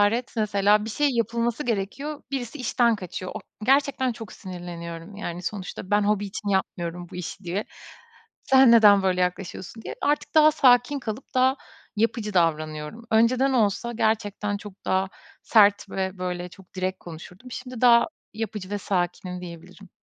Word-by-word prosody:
hararet, 230 +4 +2
mesela 210 0 +3
bir 225 - -5
şey 290 +6 +2
yapılması 235 +2 -1
gerekiyor 245 +7 -3
birisi 265 0 -4
işten 240 -2 +2
kaçıyor. 185 -1 -6
O - - -5 0.2
gerçekten 270 -1 +2
çok 225 -4 -9
sinirleniyorum, 175 0 -8
yani, 175 -4 -5
"Sonuçta 190 0 -6
ben, 205 0 +4
hobi 205 0 +1
için 205 +1 -6
yapmıyorum 175 -2 -2
bu - - -7
işi" 180 +2 -7
diye. 180 +4 -2 0.8
"Sen, 265 -2 +6
neden 205 -4 +7
böyle 185 -1 +1
yaklaşıyorsun?" 185 +4 -4
diye. - - -6
Artık 295 +2 0
daha 310 0 +7
sakin 255 -1 +4
kalıp 230 +1 -6
daha 260 +1 +4 0.4
yapıcı 215 -1 0
davranıyorum. 155 +4 -1
Önceden 250 +4 +3
olsa 230 0 +1
gerçekten 210 -2 0
çok 200 -1 -12
daha 190 0 +1 0.3
sert 205 -2 +4
ve 190 0 -3
böyle 180 -1 -4
çok 190 0 -17
direkt 185 0 -2
konuşurdum. 180 +8 -11
Şimdi 250 -1 -7
daha 235 -1 +6 0.3
yapıcı 210 -3 -5
ve 205 - -2
sakinim 180 -1 -2
diyebilirim. 180 +3 -11
205 Hz, 155 wpm, -25 LUFS, 185-235 Hz, 0.8 s, neden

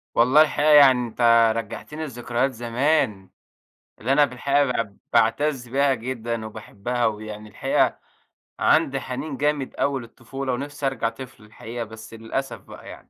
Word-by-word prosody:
والله 130 +6 +6
الحقيقة 150 0 +2
يعني 130 -5 +6
أنت 115 -1 +4
رجّعتني 115 +7 -6
لذكريات 120 0 -2
زمان، 120 - 0 0.7
اللي 125 +5 -1
أنا 145 0 +5
في 125 - -12
الحقيقة 140 +3 +2
باع 115 -5 -2 0.2
باعتز 125 +3 +2
بها 140 +2 +2
جدًا، 115 -2 -4
وباحبها 110 +2 -4
ويعني 105 0 -4
الحقيقة 100 - 0 0.6
عندي 140 -4 +3
حنين 135 +3 -5
جامد 145 -1 -1
أوي 140 -2 0
للطفولة، 130 +3 -6
ونفسي 140 +3 -5
أرجع 130 -4 0
طفل 125 -1 -11
الحقيقة 115 +2 -7
بس 110 0 -11
للأسف 115 +4 -4
بقى - - -13
يعني، - - -13
125 Hz, 140 wpm, -23 LUFS, 115-140 Hz, 0.7 s, والله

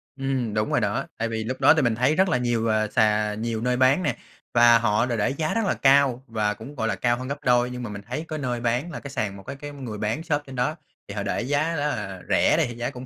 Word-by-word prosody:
Ừm, 135 -5 -2
đúng 105 0 0
rồi - - +2
đó. - - -1
Tại 115 +1 -1
vì 110 -1 -3
lúc 130 +4 -5
đó 135 - +7
thì 160 - +2
mình 120 -3 +1
thấy 125 +6 +2
rất 190 +2 +3
là 165 - +2
nhiều, 120 -2 0
à, 110 -1 +1
sà 105 0 +2
nhiều 110 +1 -3
nơi 125 +1 0
bán 130 +7 +4
nè, 150 - 0 0.4
và 120 -1 +6
họ 110 0 +2
để 120 -2 -2
để 105 - +1
giá 155 +3 -2
rất 225 -1 0
là - - +2
cao 135 -2 +3
và 105 -2 0
cũng, 115 +8 -11
gọi 115 -4 -1
là, - - 0
cao 120 -1 +1
hơn 130 +1 -6
gấp 145 +2 -5
đôi. 125 -1 +3
Nhưng 125 0 -6
mà 120 - -5
mình 100 -1 -7
thấy 130 +7 -4
cái 155 -1 -4
nơi 125 -4 -2
bán 120 +8 -1
là - - -6
cái 140 - -9
sàn, 100 -6 -3
một 95 - -12
cái 140 - -7
cái 145 +1 -8
người 130 -7 -7
bán 110 +10 -2
shop 150 -3 0
trên 135 - -9
đó 125 +5 0 0.3
thì 100 - -7
họ 100 - -2
để 100 - -1
giá 145 +6 0
rất 145 - -2
là 95 -3 -6
rẻ - - +3
đi, - - +3
thì 120 - -7
giá 120 +1 -3
cũng 125 +1 -9
125 Hz, 300 wpm, -24 LUFS, 110-140 Hz, 0.4 s, đó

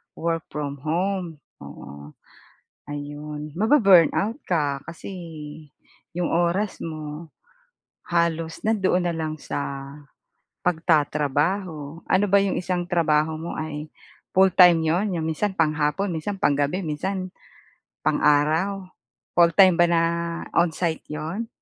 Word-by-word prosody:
work 165 0 -2
from 145 -2 -4
home, 175 0 -2 0.2
oo. 70 +1 -11 0.8
Ayon, 150 +1 -6
mabu-burn 200 - +5
out 225 +7 -1
ka 145 -5 0
kasi, 170 +3 -8 1.0
'yong 175 -1 -1
oras 175 +5 0
mo, 155 0 -6 0.8
halos 165 -1 -1
nandoon 190 -5 +2
na 175 - 0
lang 155 -1 -3
sa - - -5 1.1
pagtatrabaho. 155 0 0
Ano 190 +2 +3
ba 200 - +7
'yong 195 -1 0
isang 175 -1 -2
trabaho 160 -2 +2
mo 165 +2 -6
ay, 155 -1 -5 0.4
full-time 180 -2 +6
'yon 180 +6 +1
'yong 160 - -2
minsan 160 +6 -1
panghapon, 155 +4 +1
minsan 195 +5 -4
pang-gabi, 145 +4 +1
minsan 185 +5 -3 0.7
pang-araw? 165 +7 +2 0.5
Full-time 175 +2 +6
ba 175 0 +5
na 165 -1 +3 0.5
onsite 170 -1 +1
'yon? 165 +9 -4
165 Hz, 110 wpm, -24 LUFS, 150-185 Hz, 1.1 s, ba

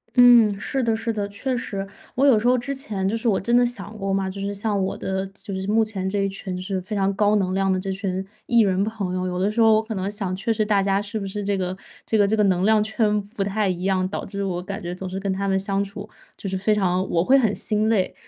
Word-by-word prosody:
嗯， 240 -5 +7
是 265 +5 -1
的 225 -1 +2
是 225 +1 -2
的， 205 -2 -2
确 245 +6 -3
实， 195 -5 -4 0.3
我 265 - 0
有 260 -5 +6
时 220 +3 0
候 250 - +5
之 255 +3 -2
前， 210 -8 -3
就 225 - -1
是 230 - -3
我 205 -4 +3
真 235 +5 +1
的 245 - +5
想 220 -3 -6
过 195 -1 -2
嘛， 195 -1 0
就 195 +1 -7
是 200 +1 -3
像 205 0 -1
我 190 - -2
的， 190 0 -3
就 195 -1 -7
是 190 0 -3
目 220 +2 +3
前 200 -4 -3
这 200 +1 -1
一 195 0 +1
群 190 -1 -5
就 180 - -5
是 190 0 -2
非 210 +4 -5
常 195 -1 +1
高 210 +1 +3
能 185 -2 0
量 195 0 +1
的 185 - 0
这 195 +1 -3
群 190 -1 -2 0.2
E 235 - +3
人 195 -2 +2
朋 205 -4 -3
友， 185 0 -2
有 180 0 -2
的 195 +2 +2
时 215 +3 -3
候 225 -1 +6
我 215 - +4
可 220 0 -6
能 190 0 -2
想 195 -3 -3
确 195 +5 0
实 215 -1 +1
大 205 -2 +2
家 195 0 +1
是 205 +2 -4
不 200 - -4
是 205 +2 -4
这 200 0 0
个 185 0 -2 0.3
这 - - -1
个 205 -2 +4
这 220 +2 +1
个 210 - +4
能 185 -2 +2
量 215 +1 +4
圈 215 -1 +1 0.2
不 200 - 0
太 205 +1 0
一 180 -1 -2
样， 185 -1 +1
导 190 - -4
致 200 -1 -4
我 180 -2 -2
感 195 +2 -5
觉 175 0 -5
总 185 +1 -6
是 190 +1 -4
跟 195 -1 -1
他 200 +1 -2
们 190 0 +2
相 195 +1 0
处， 200 +1 -7 0.3
就 - - -6
是 190 - -2
非 195 +3 +1
常 185 -2 0
我 165 -1 +2
会 260 +8 +4
很 220 -5 +2
心 215 0 0
累。 205 -5 +1
200 Hz, 315 characters per minute, -23 LUFS, 190-220 Hz, 0.3 s, 嗯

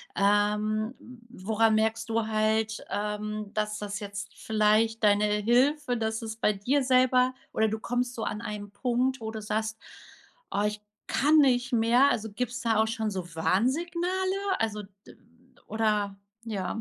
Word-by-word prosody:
ähm, 210 +3 +1
w 240 -5 -15
woran 220 0 +3
merkst 220 +1 0
du 225 -1 0
halt, 220 0 0
ähm, 210 0 -3
dass 210 0 -2
das 205 0 -4
jetzt 200 0 -6
vielleicht 220 +1 +1
deine 205 0 +4
Hilfe, 245 +6 +2
dass 220 0 -2
es 220 -1 -5
bei 215 -1 +2
dir 260 +8 0
selber 255 0 +3 0.2
oder 220 - +2
du 220 +1 -3
kommst 245 +2 -2
so 225 - -5
an 210 - -3
einen 210 -2 -6
Punkt, 250 +3 0
wo 220 0 -4
du 220 -1 -6
sagst: 220 +1 -2 0.7
„Oh, 205 - 0
ich 210 0 -5 0.3
kann 300 +3 +3
nicht 255 -3 +3
mehr.“ 240 +4 +4
Also, 220 0 -2
gibt's 250 +3 -3
da 225 -2 +2
auch - - -2
schon 220 -1 -2
so 180 -4 -6
Warnsignale? 350 - 0
Also, 210 -2 -2 0.2
d - - -14 0.5
oder 210 -3 0 0.3
ja? 210 -1 -3
220 Hz, 155 wpm, -28 LUFS, 210-245 Hz, 0.7 s, deine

